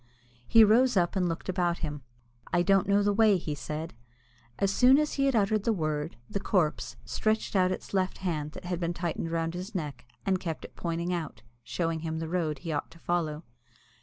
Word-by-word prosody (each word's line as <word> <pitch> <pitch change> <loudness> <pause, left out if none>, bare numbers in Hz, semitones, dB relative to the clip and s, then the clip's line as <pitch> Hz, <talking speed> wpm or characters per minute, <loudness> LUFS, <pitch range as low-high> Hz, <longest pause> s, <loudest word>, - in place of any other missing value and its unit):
He 225 - +7
rose 235 +2 +5
up, 175 +1 +2
and 180 -2 +1
looked 165 - -4
about 175 -2 +1
him. 145 -1 -5 0.5
"I 175 0 +3
don't 195 +1 +3
know 200 0 +4
the 205 0 +2
way," 215 -2 +5
he 160 -3 -4
said. 155 +2 -5 0.6
As 195 0 +1
soon 255 +4 +6
as 300 0 +1
he 275 0 +2
had 270 - +2
uttered 210 -1 +2
the 230 - +2
word, 155 -4 -2
the 200 - -3
corpse 175 -6 0
stretched 215 -1 -1
out 185 -1 +5
suddenly 185 - +1
its - - -14
left 185 -1 0
hand 155 -5 -3
that - - -10
had 175 -1 -2
been 170 0 -2
tightened 170 -1 -2
round 165 0 -1
his 185 +5 -6
neck, 145 -8 -4 0.2
and 190 -1 +2
kept 165 -4 -4
it - - -13
pointing 170 +1 -2
out, 165 -7 -5 0.2
showing 165 -2 -2
him 160 0 -3
the 160 0 -3
road 160 -3 -1
he 160 +4 -5
ought 145 - -2
to - - -16
follow. 165 -2 -1
175 Hz, 215 wpm, -29 LUFS, 160-200 Hz, 0.6 s, He